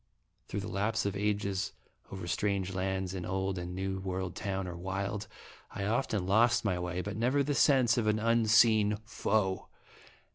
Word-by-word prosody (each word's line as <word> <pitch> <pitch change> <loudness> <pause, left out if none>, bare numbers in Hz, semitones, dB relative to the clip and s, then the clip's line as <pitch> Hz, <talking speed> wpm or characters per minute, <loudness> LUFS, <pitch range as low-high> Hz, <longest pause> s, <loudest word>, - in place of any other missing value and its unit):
Through 100 - -3
the 105 - -5
lapse 110 +1 -1
of 100 -1 -1
ages, 100 -1 -1 0.4
over 95 -2 -6
strange 95 +1 -1
lands, 95 0 -2
in 90 -2 -4
old 95 0 -2
and 90 +1 -5
new 95 0 -2
world 95 -1 -3
town 95 -1 -3
or 90 - -5
wild, 100 +3 -3 0.4
I 100 - -5
often 110 -3 0
lost 110 +5 +3
my 90 -3 +1
way, 90 +1 -2
but 100 - -5
never 125 +6 +2
the 145 +1 -1
sense 130 -4 +4
of 110 - 0
an 105 0 +3
unseen 110 -1 +4
foe. 105 -3 0
100 Hz, 170 wpm, -31 LUFS, 95-110 Hz, 0.4 s, sense